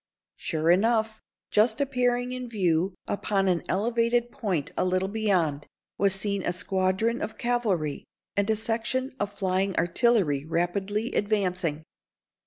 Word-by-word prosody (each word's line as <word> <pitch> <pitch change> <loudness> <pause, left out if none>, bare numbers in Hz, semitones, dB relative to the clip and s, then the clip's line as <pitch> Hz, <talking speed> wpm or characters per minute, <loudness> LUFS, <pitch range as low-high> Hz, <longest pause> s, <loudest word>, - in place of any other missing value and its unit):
Sure 160 +1 +1
enough, 220 +3 +2 0.3
just 220 +1 +3
appearing 250 -3 +1
in 255 -1 -5
view 180 -3 +1
upon 200 -1 0
an 180 -2 +2
elevated 235 +3 +1
point 180 - -2
a - - +1
little 185 +1 +1
beyond, 185 -9 0 0.3
was 195 -1 +3
seen 200 0 0
a - - 0
squadron 190 +5 0
of 220 +1 -4
cavalry, 210 -12 -1 0.3
and 200 +1 +1
a 220 - +3
section 230 +4 -1
of 205 0 -1
flying 190 -1 0
artillery 175 - +2
rapidly 190 +7 -1
advancing. 185 -7 0
200 Hz, 130 wpm, -27 LUFS, 180-230 Hz, 0.3 s, just